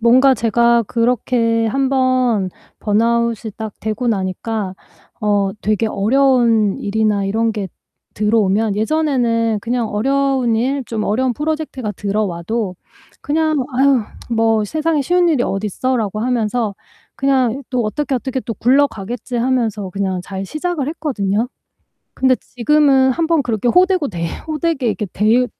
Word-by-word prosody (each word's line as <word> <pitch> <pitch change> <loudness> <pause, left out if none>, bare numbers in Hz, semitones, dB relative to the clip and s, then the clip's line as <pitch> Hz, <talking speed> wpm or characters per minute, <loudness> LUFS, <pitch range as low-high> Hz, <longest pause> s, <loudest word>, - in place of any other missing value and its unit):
뭔가 255 +3 +5
제가 235 +1 +3
그렇게 230 0 +1
1 270 +4 0
번 255 -7 +1 0.3
번아웃이 230 +1 0
딱 220 -2 -5
되고 220 +3 -2
나니까 195 0 -2 0.5
어 205 -2 +1
되게 215 +1 +1
어려운 230 -1 +2
일이나 210 -1 0
이런 225 +3 0
게 205 -3 -4 0.5
들어오면 210 -1 +1
예전에는 230 -4 +1
그냥 235 -1 -1
어려운 265 +1 +1
일, 265 +4 -1
좀 220 -2 -3
어려운 250 +4 +1
프로젝트가 300 -5 -3
들어와도 200 0 -2 0.5
그냥 310 +1 +1 0.2
'아휴. 265 -1 +3 0.3
뭐 225 -1 +2
세상에 310 +6 0
쉬운 350 +5 +2
일이 275 -6 +2
어딨어?'라고 215 +1 -1
하면서 230 -2 0 0.4
'그냥 270 -1 +1
또 250 -2 0
어떻게 285 +6 -2
어떻게 260 +1 -2
또 235 - -5
굴러가겠지.' 245 -2 0
하면서 230 -5 0
그냥 190 -1 -2
잘 190 +1 -6
시작을 310 - -3
했거든요. 240 -9 -1 0.7
근데 260 0 +3
지금은 270 0 +3
1 325 +4 -1
번 325 -3 +2
그렇게 230 -1 -1
호되고 360 +3 +3
데 170 -6 -4 0.2
호되게 310 -4 -1
이렇게 210 -1 -1
데여 220 +5 +3
235 Hz, 295 characters per minute, -18 LUFS, 215-265 Hz, 0.7 s, 뭔가